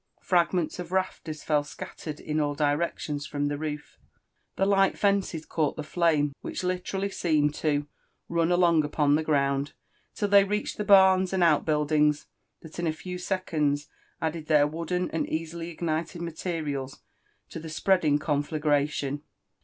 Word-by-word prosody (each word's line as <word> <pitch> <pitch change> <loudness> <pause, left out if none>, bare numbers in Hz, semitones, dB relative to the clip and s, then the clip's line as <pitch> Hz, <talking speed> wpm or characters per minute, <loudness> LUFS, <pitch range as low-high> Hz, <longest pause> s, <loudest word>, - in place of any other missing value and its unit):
Fragments 175 -1 +1
of 175 -1 -6
rafters 185 -5 -2
fell 150 -2 +2
scattered 150 +1 -8
in 155 0 -2
ail 145 -1 0
directions 145 0 -1
from 145 0 -1
the 145 - -2
roof; 150 -1 -6 0.6
the 195 - +1
light 195 -1 +3
fences 195 -6 0
caught 155 -3 -1
the 155 - -5
flame, 155 -3 +1
which - - -5
literally 185 +2 -2
seemed 150 -5 +1
to 145 -1 0 0.4
tun 170 0 +1
along 170 -3 +4
upon* 145 -1 +1
the 155 - +3
ground," 140 -2 0 0.4
till 205 - 0
they 200 0 +6
reached 210 +2 -2
the 210 - -1
barns 190 -2 +5
and 185 -2 +2
oatbwldings, 150 -1 +2 0.4
that 160 +1 -10
in 170 - 0
a - - +2
few 180 +3 -7
seconds 155 -6 -1 0.3
added 160 -1 -3
their 150 -2 +5
wooden 170 +4 -2
and 165 - -2
easily 165 +1 -4
ignited 165 +1 -3
materials 155 -5 -4 0.5
to - - -7
the 160 0 -8
spreading 155 -2 +2
conflagration 145 -1 0
160 Hz, 150 wpm, -27 LUFS, 150-180 Hz, 0.6 s, they